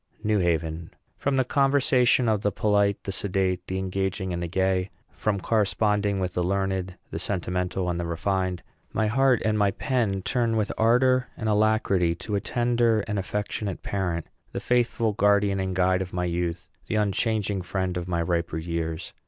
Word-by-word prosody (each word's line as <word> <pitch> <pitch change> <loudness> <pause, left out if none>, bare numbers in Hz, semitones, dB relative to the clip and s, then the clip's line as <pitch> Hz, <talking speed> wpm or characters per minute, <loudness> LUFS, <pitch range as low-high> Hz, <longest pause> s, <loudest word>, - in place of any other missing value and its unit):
NEW 105 -1 +2
HAVEN. 80 -2 -1 0.3
From 140 -1 -1
the 130 - +3
conversation 130 -2 +3
of 110 -2 +2
the 105 - +1
polite, 100 0 +1
the 100 - -3
sedate, 95 -2 -1
the 95 - -2
engaging, 95 0 -2
and 85 - -3
the 85 - -2
gay, 95 +1 0 0.2
from 105 -2 -1
corresponding 105 -1 +1
with 90 -1 -2
the 90 - 0
learned, 95 0 -1 0.2
the - - -4
sentimental, 90 -1 -2
and 85 -1 -1
the 85 - -2
refined, 90 +2 -1 0.3
my 110 - +1
heart 130 +2 +3
and 110 -1 +1
my 100 -1 +4
pen 100 -3 -1
turn 115 -1 +1
with 105 -1 0
ardor 125 +3 +3
and 110 - -3
alacrity 105 -5 +2
to 105 - -6
a 100 - +1
tender 120 -2 +2
and 105 -1 -3
affectionate 100 0 -3
parent, 90 -4 -2 0.3
the - - -2
faithful 120 -2 +1
guardian 100 -1 +3
and 95 -1 -2
guide 95 0 +2
of 90 -1 -5
my 90 0 -1
youth, 85 -1 -2 0.2
the - - -2
unchanging 105 -1 0
friend 90 0 -2
of 90 -1 -3
my 85 -2 0
riper 85 -1 -1
years. 80 0 -4
95 Hz, 175 wpm, -26 LUFS, 90-110 Hz, 0.3 s, my